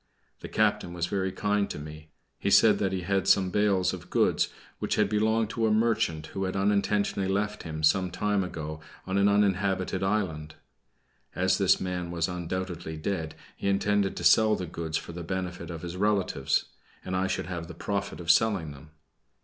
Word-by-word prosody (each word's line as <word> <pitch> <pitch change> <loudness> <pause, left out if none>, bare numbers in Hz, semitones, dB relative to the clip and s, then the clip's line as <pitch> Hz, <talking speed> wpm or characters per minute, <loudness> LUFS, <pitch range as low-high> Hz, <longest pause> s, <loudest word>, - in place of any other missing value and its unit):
The - - -7
captain 85 - +1
was 85 -1 -1
very 95 +1 -1
kind 105 +1 0
to - - -5
me. 75 +1 -9 0.3
He - - 0
said - - +6
that 95 - 0
he 95 -1 -2
had 95 +1 0
some 95 -1 +4
bales 100 -3 +2
of - - -8
goods - - +2 0.3
which - - -1
had 105 - +3
belonged 110 +1 +1
to 115 -1 0
a - - +2
merchant 110 -8 +1
who 95 0 -2
had 95 - -3
unintentionally 100 0 +1
left 105 +2 -1
him 80 -2 -6
some 90 +4 +3
time 105 +2 0
ago 80 -3 -6 0.3
on 95 +1 0
an 100 +1 +4
uninhabited 95 -2 +1
island. 90 -7 -1 0.8
As 95 +1 +2
this 95 -2 +4
man 90 -2 -3
was 85 0 -1
undoubtedly 90 -2 -4
dead, 80 -2 -3 0.2
he - - -4
intended 100 0 +1
to - - -5
sell 110 -1 +5
the 90 - -4
goods 80 -1 -3
for - - -7
the 85 +1 -7
benefit 90 0 -4
of 85 -1 -7
his 85 0 -5
relatives, 100 -1 +1 0.4
and 95 - -2
I 95 +1 +1
should - - -2
have 85 -2 -5
the 85 - -9
profit 100 +3 -3
of 85 0 +3
selling 100 -9 +2
them. 70 +2 -13
95 Hz, 190 wpm, -28 LUFS, 85-100 Hz, 0.8 s, said